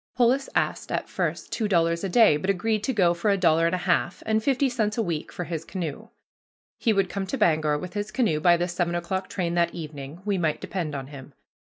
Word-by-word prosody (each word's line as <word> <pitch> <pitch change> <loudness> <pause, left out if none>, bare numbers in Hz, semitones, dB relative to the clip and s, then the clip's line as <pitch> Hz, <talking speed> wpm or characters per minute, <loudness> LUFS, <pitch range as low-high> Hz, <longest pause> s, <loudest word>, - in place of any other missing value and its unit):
Polis 255 +3 +3
asked - - -1
at - - -2
first - - -3
two 220 - -1
dollars 170 -2 +2
a 195 - -1
day 215 -4 +6
but 170 +6 -3
agreed 210 +3 0
to - - +1
go 180 -8 +3
for 170 +5 -1
a 200 - +3
dollar 165 -2 +3
and 170 - +1
a 180 - -5
half, 180 -1 0
and 220 0 +1
fifty 270 +3 +2
cents 220 -4 -1
a - - +2
week 165 -5 -3
for 180 - -5
his 165 -2 -4
canoe. 165 -4 -5 0.7
He 230 - +2
would 195 -3 +2
come 195 +1 -4
to 270 - -2
Bangor 155 - +2
with 180 +4 -7
his 205 0 -3
canoe 215 -10 +1
by 175 +2 +5
the 175 +1 -1
seven 175 -1 -1
o'clock 185 +2 -3
train 175 -3 -2
that 170 -1 +1
evening 155 0 -8
we 200 -3 0
might 155 -3 0
depend 165 -6 -4
on 135 -1 -4
him. 140 -1 -11
175 Hz, 235 wpm, -25 LUFS, 165-210 Hz, 0.7 s, day